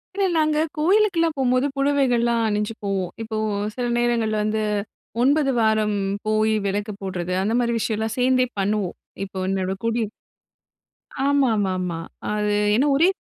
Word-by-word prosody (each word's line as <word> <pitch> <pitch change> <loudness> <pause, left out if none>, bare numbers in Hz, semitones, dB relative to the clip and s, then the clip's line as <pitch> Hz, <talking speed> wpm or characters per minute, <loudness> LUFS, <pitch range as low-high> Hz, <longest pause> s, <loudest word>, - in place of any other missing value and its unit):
இல்ல, 395 -1 +1
நாங்க 305 -1 +2 0.2
கோயிலுக்கெல்லாம் 340 -1 +3
போகும்போது 255 +1 +2
புடவைகள்லாம் 245 -5 +2
அணிஞ்சு 210 +1 -1
போவோம். 195 -3 -1
இப்போ 220 -1 -4 0.4
சில 250 -1 -2
நேரங்கள் 235 -2 +1
வந்து 215 +1 0 0.6
9 280 +1 +3
வாரம் 215 -1 +2 0.3
போய் 215 0 +2
விளக்கு 205 +2 -2
போடுறது, 185 -2 -3
அந்த 215 +3 0
மாதிரி 235 -1 +1
விஷயம்லாம் 220 0 -1
சேர்ந்தே 255 0 +3
பண்ணுவோம், 200 -2 0 0.3
இப்போ 190 -1 -6
என்னோட 190 -1 -1
குடிய, 230 0 +1 1.2
ஆமா, 280 -3 +3
ஆமா, 200 -2 0
ஆமா. 175 -2 -3 0.3
அது 210 0 0 0.2
என்ன 265 +5 +3
ஒரே, 330 +6 +5
225 Hz, 135 wpm, -23 LUFS, 210-265 Hz, 1.2 s, ஒரே